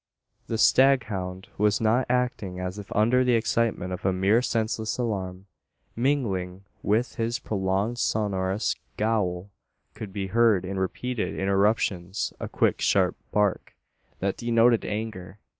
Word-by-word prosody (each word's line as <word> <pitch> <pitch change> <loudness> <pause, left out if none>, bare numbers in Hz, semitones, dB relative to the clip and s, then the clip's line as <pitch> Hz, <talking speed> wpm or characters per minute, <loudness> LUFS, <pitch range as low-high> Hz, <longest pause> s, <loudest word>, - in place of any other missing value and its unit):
The 115 - -2
staghound 105 -9 +3
was 105 0 +3
not 115 +3 +2
acting 120 -7 -1
as 90 +2 -4
if 100 - -10
under 120 +5 +4
the 125 -1 +2
excitement 110 -5 0
of 90 - -6
a 95 - +2
mere 95 +5 +3
senseless 110 -2 -1
alarm. 95 -6 -3 0.5
Mingling 100 -8 -1 0.2
with 110 +4 0
his 115 +1 -1
prolonged 100 +3 -1
sonorous 100 -3 0 0.2
"gowl" 100 -4 -1 0.4
could 105 -3 -8
be 95 0 -3
heard 110 -2 +3
in 95 +1 -3
repeated 120 +5 -2
interruptions 95 -1 0
a - - -5
quick - - +1
sharp - - +2 0.2
bark, 105 -2 0 0.4
that 95 0 -2
denoted 115 0 +3
anger. 105 -3 -5
105 Hz, 130 wpm, -26 LUFS, 95-115 Hz, 0.5 s, under